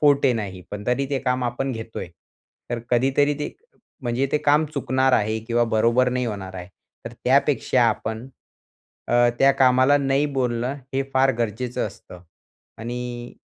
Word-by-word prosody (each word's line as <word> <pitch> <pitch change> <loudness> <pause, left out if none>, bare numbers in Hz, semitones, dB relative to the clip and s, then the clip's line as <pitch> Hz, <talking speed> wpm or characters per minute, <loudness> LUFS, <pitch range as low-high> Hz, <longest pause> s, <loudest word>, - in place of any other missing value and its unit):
Forte 140 -3 +4
नाही 100 -5 -4
पण 105 0 -7
तरी 130 +3 +1
ते 140 - 0
काम 125 -1 0
आपण 125 +3 -2
घेतोय. 115 -3 -6 0.6
तर 120 - -1
कधीतरी 135 +4 +2
ते, 150 - -4 0.5
म्हणजे 120 +2 0
ते 150 - +3
काम 150 +2 +3
चुकणार 130 -1 +1
आहे 110 -1 +2
किंवा 120 0 +1
बरोबर 115 +3 +3
नाही 125 0 -1
होणार 100 -4 -5
आहे. 90 0 -7 0.4
तर 115 - -7
त्यापेक्षा 135 -1 +3
आपण, 110 +2 -3 0.8
अ, 120 0 +4
त्या 135 0 +5
कामाला 130 +2 +5
नाही 140 +1 +1
बोलणं 125 +1 -1 0.2
हे 135 - +1
फार 135 0 +4
गरजेचं 120 +2 -2
असतं 100 -3 -12 0.6
आणि 120 +1 -6
125 Hz, 150 wpm, -23 LUFS, 115-135 Hz, 0.8 s, त्या